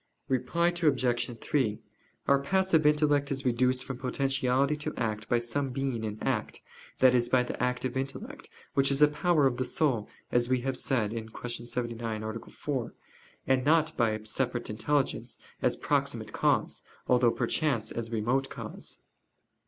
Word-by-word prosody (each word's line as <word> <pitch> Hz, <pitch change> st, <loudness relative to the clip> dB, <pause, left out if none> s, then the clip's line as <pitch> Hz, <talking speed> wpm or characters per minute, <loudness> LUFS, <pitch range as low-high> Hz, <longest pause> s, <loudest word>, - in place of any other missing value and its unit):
Reply 135 Hz, +7 st, +1 dB
Obj. 130 Hz, -8 st, +1 dB
3: 120 Hz, -8 st, 0 dB, 0.5 s
Our 140 Hz, 0 st, +5 dB
passive 165 Hz, +1 st, +2 dB
intellect 150 Hz, -2 st, +3 dB
is 135 Hz, -1 st, -2 dB
reduced 125 Hz, +1 st, +2 dB
from 135 Hz, -2 st, -6 dB
potentiality 135 Hz, +1 st, +1 dB
to 150 Hz, -, -4 dB
act 110 Hz, -2 st, -2 dB
by 120 Hz, -, +4 dB
some 125 Hz, +4 st, -1 dB
being 130 Hz, -3 st, -2 dB
in 105 Hz, -1 st, -3 dB
act, -, -, -1 dB, 0.4 s
that 130 Hz, -1 st, +6 dB
is, 120 Hz, -1 st, +2 dB
by 125 Hz, 0 st, +4 dB
the 125 Hz, -, -5 dB
active 125 Hz, 0 st, -1 dB
intellect, 210 Hz, -, -5 dB, 0.2 s
which 135 Hz, 0 st, +3 dB
is 140 Hz, +1 st, +4 dB
a -, -, +9 dB
power 150 Hz, 0 st, +2 dB
of 125 Hz, -2 st, +2 dB
the 130 Hz, -, 0 dB
soul, 130 Hz, -, 0 dB, 0.2 s
as 120 Hz, 0 st, +2 dB
we 130 Hz, -1 st, +2 dB
have 135 Hz, +1 st, -2 dB
said 120 Hz, -5 st, 0 dB
(Q. 115 Hz, +1 st, -6 dB
79, 115 Hz, -2 st, -3 dB
A. 110 Hz, +1 st, -4 dB
4); 135 Hz, -5 st, -4 dB, 0.5 s
and 130 Hz, -1 st, +2 dB
not 160 Hz, +2 st, +3 dB
by 115 Hz, -2 st, +3 dB
a 110 Hz, 0 st, -4 dB
separate 120 Hz, +1 st, -1 dB
intelligence, 140 Hz, +6 st, -1 dB, 0.2 s
as -, -, +2 dB
proximate -, -, -1 dB
cause, -, -, +1 dB, 0.3 s
although 125 Hz, -1 st, +4 dB
perchance 120 Hz, -4 st, 0 dB
as 115 Hz, -1 st, -4 dB
remote 120 Hz, +5 st, 0 dB
cause. -, -, -7 dB
130 Hz, 160 wpm, -29 LUFS, 120-140 Hz, 0.5 s, a